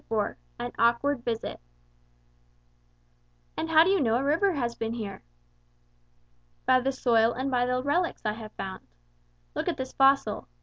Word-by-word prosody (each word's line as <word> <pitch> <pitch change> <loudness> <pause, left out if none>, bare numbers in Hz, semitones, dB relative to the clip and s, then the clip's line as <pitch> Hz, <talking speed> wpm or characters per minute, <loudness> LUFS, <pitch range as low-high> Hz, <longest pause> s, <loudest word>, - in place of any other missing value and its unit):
IV 215 -2 0 0.2
AN 240 0 -4
AWKWARD 240 +3 +2
VISIT 230 -2 -3 2.0
"And 325 - -3
how 320 0 +7
do 370 - +2
you 390 -4 +3
know 230 -4 +2
a 255 - +1
river 330 +7 +2
has 240 -6 -1
been 225 -1 -3
here?" 215 -4 -6 1.4
"By 255 0 +5
the 265 +2 0
soil 235 -3 +3
and 265 +2 -3
by 245 -1 +2
the 250 0 0
relics 335 +5 0
I 210 - +1
have 220 -1 -9
found. 190 -1 -7 0.7
Look - - -3
at - - -2
this 260 0 -5
fossil. 270 -5 +3
250 Hz, 160 wpm, -27 LUFS, 230-280 Hz, 2.0 s, how